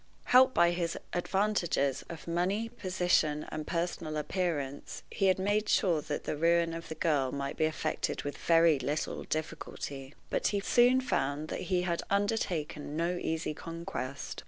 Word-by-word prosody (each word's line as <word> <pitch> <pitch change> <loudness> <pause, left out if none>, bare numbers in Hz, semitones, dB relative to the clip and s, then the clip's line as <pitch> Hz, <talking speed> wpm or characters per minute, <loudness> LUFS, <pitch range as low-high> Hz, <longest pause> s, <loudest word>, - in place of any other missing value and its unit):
Helped 260 +1 +6
by 170 0 +5
his 170 -1 -2 0.2
advantages 175 -7 0
of 165 -1 -8
money, 190 +7 0
position, 180 -8 +1
and 155 -1 -5
personal 165 -2 -2
appearance, 150 -4 -3
he 195 - +1
had 185 - +4
made 205 +2 0
sure 170 -6 +3
that 150 -1 -4
the - - -2
ruin 170 +2 +2
of 165 0 -6
the 160 - -5
girl 145 -6 +1
might 140 0 -3
be 155 - +2
effected 155 0 -2
with 145 - -4
very 165 -3 +4
little 145 +4 -2
difficulty; 150 -3 -5 0.2
but - - +1
he 205 - +1
soon 245 +5 +4
found 150 - -1
that - - -3
he 180 -2 +2
had 170 -2 -1
undertaken 180 -8 -1
no 170 +2 0
easy 160 -1 -2
conquest. 165 -5 -6
165 Hz, 160 wpm, -31 LUFS, 150-185 Hz, 0.2 s, Helped